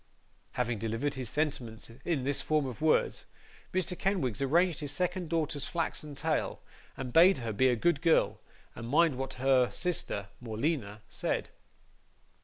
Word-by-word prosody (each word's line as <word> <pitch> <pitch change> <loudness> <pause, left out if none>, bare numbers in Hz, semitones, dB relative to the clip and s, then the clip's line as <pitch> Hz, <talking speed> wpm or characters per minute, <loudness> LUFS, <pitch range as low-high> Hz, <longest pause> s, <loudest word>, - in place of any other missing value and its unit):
Having 120 -3 -1
delivered 115 +6 -1
his 130 -4 -3
sentiments 135 -8 -2
in 160 -7 0
this 140 +1 +1
form 155 -2 +1
of 130 0 -6
words, 160 0 +2 0.4
Mr. 185 0 0
Kenwigs 170 - -1
arranged 165 +4 +3
his 145 -3 -3
second 180 +2 -2
daughter's 155 -3 0
flaxen 155 -3 -3
tail, 155 +2 -1 0.4
and 125 -2 -5
bade 180 +4 +7
her 115 -3 -3
be 130 +6 +3
a 125 - +3
good 145 +4 +1
girl 165 -2 +3 0.3
and 115 - -7
mind 155 +1 +4
what 135 +1 -4
her 130 -1 +3
sister, 150 - -2
Morleena, 110 -2 -2
said. - - -2
140 Hz, 150 wpm, -31 LUFS, 125-165 Hz, 0.4 s, bade